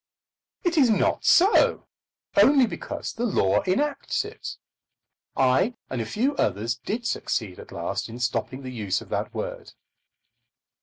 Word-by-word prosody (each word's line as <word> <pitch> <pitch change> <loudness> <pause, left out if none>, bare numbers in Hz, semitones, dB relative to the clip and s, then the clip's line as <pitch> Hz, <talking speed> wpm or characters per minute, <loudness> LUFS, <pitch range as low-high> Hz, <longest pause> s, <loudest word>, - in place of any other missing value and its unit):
It 345 -3 +2
is 260 -4 +5
not 220 - +1
so, 380 +5 +5 0.5
only 275 -2 +6
because 225 - -5
the 230 - -4
law 95 - +2
enacts 285 +10 0
it. - - -8 0.8
I 135 - +3 0.2
and 130 -3 -2
a 110 - -4
few 260 - 0
others 115 +4 0
did 220 - -5
succeed 105 - -2
at - - -12
last - - -3
in 115 - -8
stopping 125 +2 -2
the 130 - -6
use 105 -6 -2
of - - -13
that - - -2
word. - - -6
185 Hz, 145 wpm, -25 LUFS, -, 0.8 s, only